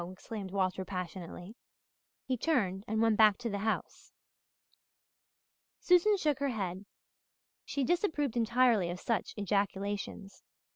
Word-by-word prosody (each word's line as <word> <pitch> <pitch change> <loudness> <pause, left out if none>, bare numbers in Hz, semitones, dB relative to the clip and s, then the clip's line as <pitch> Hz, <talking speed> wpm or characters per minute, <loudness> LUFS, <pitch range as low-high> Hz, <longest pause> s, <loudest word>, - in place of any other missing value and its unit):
exclaimed 195 +1 -7
Walter 190 -1 -1
passionately. 180 +1 -6 0.7
He 260 - 0
turned 220 - 0
and 220 +1 +1
went 225 -2 +3
back 215 -2 +6
to 240 -2 -4
the 200 - -2
house. 220 +2 -3 1.7
Susan 365 +4 +4
shook 300 -6 0
her 280 0 0
head. 195 -4 -4 0.8
She 280 - -2
disapproved 315 - 0
entirely 235 -5 +3
of 175 +1 -5
such 230 +3 -2
ejaculations. 200 0 -2
210 Hz, 115 wpm, -32 LUFS, 190-255 Hz, 1.7 s, back